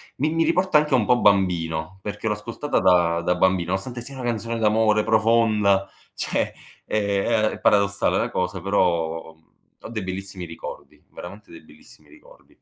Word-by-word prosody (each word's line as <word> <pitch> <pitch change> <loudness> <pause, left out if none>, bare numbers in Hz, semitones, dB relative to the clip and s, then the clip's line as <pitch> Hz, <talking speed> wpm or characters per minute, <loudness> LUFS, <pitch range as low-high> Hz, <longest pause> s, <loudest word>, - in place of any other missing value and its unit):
mi 150 +4 0
mi 165 0 +2
riporta 170 0 +2
anche 150 -3 +1
un 110 -4 +2
po' 125 -1 +3
bambino, 90 -3 +1
perché 105 +2 -5
l'ho 105 - +1
ascoltata 115 +7 -3
da 85 -2 +3
da 90 +1 0
bambino, 90 -1 +1
nonostante 120 +6 -3
sia 135 +3 -8
una 130 - -7
canzone 115 -1 -2
d'amore, 110 -1 +2
profonda, 110 -3 +2 0.3
cioè, - - -1 0.3
ehm, 105 +2 0
è - - -8
paradossale 100 -1 +2
la - - -1
cosa, 90 +1 -2
però, 85 -4 -1
uhm, 80 0 -32 0.3
ho - - -8
dei 110 -4 -4
bellissimi 95 -1 -6
ricordi, 85 0 -10
veramente 100 +4 -11
dei 85 - -12
bellissimi 75 0 -18
ricordi. - - -20
100 Hz, 165 wpm, -23 LUFS, 90-115 Hz, 0.3 s, po